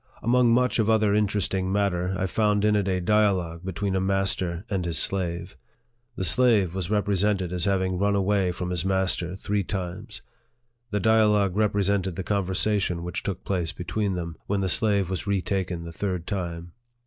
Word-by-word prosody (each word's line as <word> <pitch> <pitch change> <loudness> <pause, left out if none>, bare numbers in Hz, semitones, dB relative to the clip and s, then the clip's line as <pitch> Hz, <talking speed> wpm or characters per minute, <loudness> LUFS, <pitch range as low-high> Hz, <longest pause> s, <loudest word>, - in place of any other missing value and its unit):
Among 120 +1 +3
much 125 +1 +2
of 110 0 +2
other 110 -2 +3
interesting 100 -2 0
matter, 95 -2 0
I 95 - -1
found 105 +1 +1
in 105 0 +3
it 100 -2 +1
a 95 -1 0
dialogue 90 -4 +1
between 95 +1 -2
a 95 - +1
master 95 -2 0
and 95 -4 -2
his 85 -2 -1
slave. 90 -3 -1 0.6
The 95 - -3
slave 100 -1 +4
was 95 -2 -4
represented 100 -3 0
as 90 -2 0
having 95 -2 0
run 100 +1 +2
away 100 -1 +1
from 90 0 -4
his 90 -2 -1
master 95 -2 0
three 100 +1 -2
times. 95 +3 -6 0.7
The 105 - -1
dialogue 105 -2 +3
represented 100 -3 +1
the 95 - -4
conversation 95 -2 0
which 90 - -4
took 95 -4 -4
place 85 -4 -1
between 95 +3 -2
them, 85 -2 -5
when 100 -1 0
the 95 - -1
slave 100 0 +2
was 95 +1 -4
retaken 95 -3 -1
the 85 0 -8
third 90 -1 -3
time. 85 -4 -4
95 Hz, 170 wpm, -25 LUFS, 90-105 Hz, 0.7 s, slave